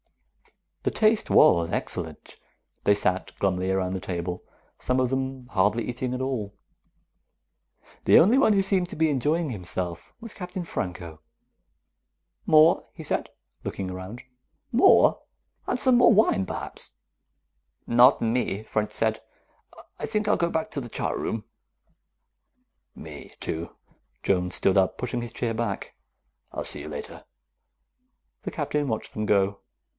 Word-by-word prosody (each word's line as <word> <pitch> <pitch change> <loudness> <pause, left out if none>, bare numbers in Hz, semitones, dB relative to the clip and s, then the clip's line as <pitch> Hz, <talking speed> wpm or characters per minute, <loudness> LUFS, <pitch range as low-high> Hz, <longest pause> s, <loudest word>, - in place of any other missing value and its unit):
The - - 0
taste 220 0 +2
was 85 - +5
excellent. - - -5 0.5
They 100 - +5
sat 95 -2 -1
glumly 95 -1 0
around 95 -1 0
the 95 - -2
table, 90 0 -4 0.4
some 125 0 0
of 130 -1 +1
them 130 -1 -3
hardly 105 +2 +1
eating 125 +1 -3
at 125 - -4
all. 120 -7 -3 1.5
The - - +7
only 225 +10 +6
one 220 -6 +5
who 195 -1 +3
seemed 190 -2 +1
to - - -7
be 160 0 +2
enjoying 150 +3 0
himself 90 -4 -5
was 230 -2 -8
Captain 180 0 -6
Franco. 85 - -5 1.3
"More?" 155 +2 +5
he - - -9
said, - - -2 0.3
looking 95 -2 -4
around. 95 +6 -8 0.5
"More? 250 +11 +5 0.5
And - - 0
some 250 -1 +4
wine, 215 - +4
perhaps." - - -6 1.0
"Not 120 +2 +6
me," 115 -3 -1
French 110 -1 -2
said. - - 0 0.8
"I - - -3
think 215 0 -1
I'll - - +4
go 170 - 0
back 160 -1 -2
to 140 - -3
the 120 - -8
chart - - -2
room." 110 -1 -3 1.5
"Me, - - -10
too." 80 +1 -5 0.5
Jones 90 -2 +1
stood 95 0 +4
up, 95 - +1
pushing 125 -1 -3
his 120 -1 -6
chair 115 -1 -2
back. 110 -3 -3 0.6
"I'll - - -5
see - - 0
you 75 - -7
later." 75 -1 -8 1.2
The - - -4
Captain 150 -1 -2
watched 110 -3 -4
them 105 0 -3
go. 100 0 +2
120 Hz, 140 wpm, -26 LUFS, 95-155 Hz, 1.5 s, The